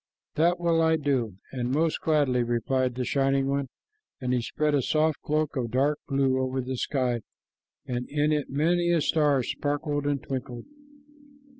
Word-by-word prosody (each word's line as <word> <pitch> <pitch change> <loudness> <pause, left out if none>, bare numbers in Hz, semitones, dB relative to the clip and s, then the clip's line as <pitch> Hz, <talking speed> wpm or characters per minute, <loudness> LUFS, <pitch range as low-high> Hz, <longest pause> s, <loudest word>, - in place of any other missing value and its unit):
"That 170 +3 +2
will 170 -1 +2
I 160 0 +4
do, 130 -10 -1
and 125 -2 -2
most 160 +3 +1
gladly," 145 -6 +2
replied 120 +2 0
the 125 0 -2
Shining 135 0 +1
One, 140 -1 -1 0.5
and 125 -1 -1
he 125 - +1
spread 150 +5 -1
a 140 - +3
soft 155 +3 +1
cloak 155 0 -1
of 125 -3 -1
dark 140 +5 +1
blue 135 -1 +1
over 130 0 -1
the 130 +1 -3
sky, 125 -2 -1 0.6
and 125 0 -4
in 150 +1 +1
it 150 -2 0
many 170 +5 +1
a 170 -2 +3
star 145 -3 +2
sparkled 145 +2 -2
and 145 -1 +1
twinkled. 125 -2 -5
140 Hz, 165 wpm, -27 LUFS, 130-150 Hz, 0.6 s, I